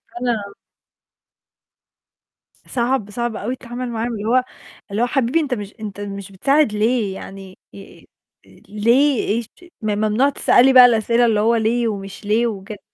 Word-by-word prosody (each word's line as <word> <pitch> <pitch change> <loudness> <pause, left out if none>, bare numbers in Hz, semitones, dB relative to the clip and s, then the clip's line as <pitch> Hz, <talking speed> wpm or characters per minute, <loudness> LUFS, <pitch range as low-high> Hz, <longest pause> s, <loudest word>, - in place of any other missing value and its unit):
وأنا 230 -5 -3 2.1
صعب، 240 -3 -1
صعب 235 0 -3
أوي 240 +5 -3
التعامل 245 0 -6
معاهم. 235 +1 -3
اللي 210 -1 -5
هو 250 +3 +3 0.5
اللي 210 +4 -1
هو - - +4
حبيبي 270 +4 +1
أنت 285 -5 -2
مش 205 0 -8
أنت 205 -2 -7
مش 200 -1 -7
بتساعد 275 +6 +2
ليه 215 -1 0
يعني؟ 195 -1 -10 0.2
ي 195 - -14 0.4
آآ - - -22 0.2
ليه 235 +6 +2
إيش 225 +1 -1 0.3
ممنوع 215 +5 +1
تسألي 265 -1 +4
بقى 255 -1 +10
الأسئلة 235 0 +3
اللي 215 -2 +2
هو 230 +2 +3
ليه 230 +2 +1
ومش 200 -1 -6
ليه 225 +3 +2
وكده. 205 -1 -7
225 Hz, 150 wpm, -20 LUFS, 205-245 Hz, 2.1 s, بقى